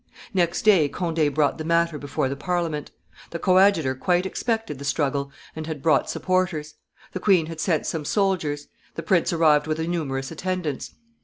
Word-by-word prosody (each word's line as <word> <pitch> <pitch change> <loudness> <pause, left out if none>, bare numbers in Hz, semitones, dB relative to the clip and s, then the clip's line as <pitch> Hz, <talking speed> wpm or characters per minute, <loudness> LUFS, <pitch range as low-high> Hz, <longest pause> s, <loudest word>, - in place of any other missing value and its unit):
Next 175 0 +1
day 190 -9 +5
Conde 165 -4 0
brought 150 +1 +1
the - - -3
matter 170 -1 +1
before 140 -1 -2
the 135 - -3
Parliament. 165 -2 -2 0.4
The 170 - -4
coadjutor 185 -6 +4
quite 175 +7 +1
expected 225 - -2
the - - -7
struggle, 140 -1 -1 0.2
and 160 0 -6
had 155 -4 -5
brought 160 - +3
supporters; 180 -5 -1 0.4
the - - -4
queen 185 -6 +3
had 165 0 -8
sent 165 -2 0
some 160 -2 -2
soldiers; 160 -5 0 0.3
the 165 - -5
prince 175 +1 +2
arrived 155 -3 +3
with 155 0 -1
a 160 - -1
numerous 140 -6 -3
attendance. 170 -3 -3
160 Hz, 170 wpm, -24 LUFS, 150-180 Hz, 0.4 s, day